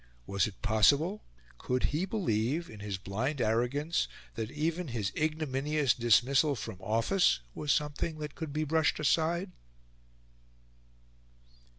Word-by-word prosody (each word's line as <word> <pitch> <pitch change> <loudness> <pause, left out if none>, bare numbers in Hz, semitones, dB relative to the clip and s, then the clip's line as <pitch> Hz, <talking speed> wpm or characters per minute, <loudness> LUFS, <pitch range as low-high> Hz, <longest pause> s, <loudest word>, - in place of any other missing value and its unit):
Was 100 - +1
it 100 -4 -11
possible? 140 - +3 0.4
Could 125 0 -1
he 165 +5 +1
believe, 165 - -1
in 110 - -11
his 100 -2 -4
blind 115 +10 -3
arrogance, 125 +9 +1 0.3
that 110 -1 -4
even 165 +5 -2
his 115 -6 -2
ignominious 150 -3 0
dismissal 130 +5 +3
from 100 -4 -6
office 115 - +2
was 150 - -1
something 150 +3 -1
that 150 -1 -6
could 160 -3 -6
be 155 +2 -1
brushed 155 +1 +2
aside? 170 +5 +1
145 Hz, 120 wpm, -31 LUFS, 110-155 Hz, 0.4 s, possible